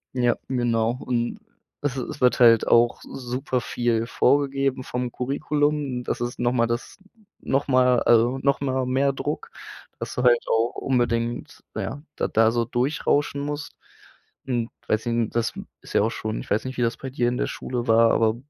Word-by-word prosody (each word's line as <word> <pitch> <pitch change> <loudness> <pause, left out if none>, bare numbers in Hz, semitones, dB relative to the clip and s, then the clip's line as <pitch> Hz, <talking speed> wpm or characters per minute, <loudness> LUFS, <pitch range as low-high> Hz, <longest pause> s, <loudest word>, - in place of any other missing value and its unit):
Ja, 120 -1 +2
genau 120 -2 0
und 120 -1 -2 0.4
es 145 -3 -1
es 130 - -5
wird 125 -1 +3
halt 115 -2 +6
auch 120 0 +4
super 125 0 -3
viel 115 -1 -1
vorgegeben 135 -1 +1
vom 125 -1 -3
Curriculum. 145 0 -1
Das 120 - -3
ist 120 0 -4
noch 120 - +2
mal 120 -2 +2
das 120 +1 -4 0.4
noch 135 +2 0
mal 125 -2 +4
also 120 +3 +3
noch 140 +1 +1
mal 130 -2 -1
mehr 135 +2 +2
Druck, 145 +2 -4 0.5
dass - - -5
du 125 - -1
halt 120 -1 +5
auch 115 +1 +1
unbedingt, 120 -2 -1
na - - -2
ja, 145 - -5
da - - -1
da 110 0 +4
so 120 0 0
durchrauschen 140 +3 0
musst. 145 +1 -5 0.7
Hm, 120 -3 -1 0.2
weiß 110 +2 0
i 115 -1 0
das 115 -1 -1 0.3
ist - - -11
ja - - +4
auch 110 - +2
schon 110 -1 -4
ich - - -12
weiß 105 - 0
nicht, 130 0 -5
wie 125 - -1
das 115 0 0
bei 135 - -7
dir 125 -2 0
in 125 +1 0
der - - 0
Schule 125 -1 -4
war, 115 0 +5
aber 110 -1 +2
125 Hz, 185 wpm, -24 LUFS, 115-135 Hz, 0.7 s, halt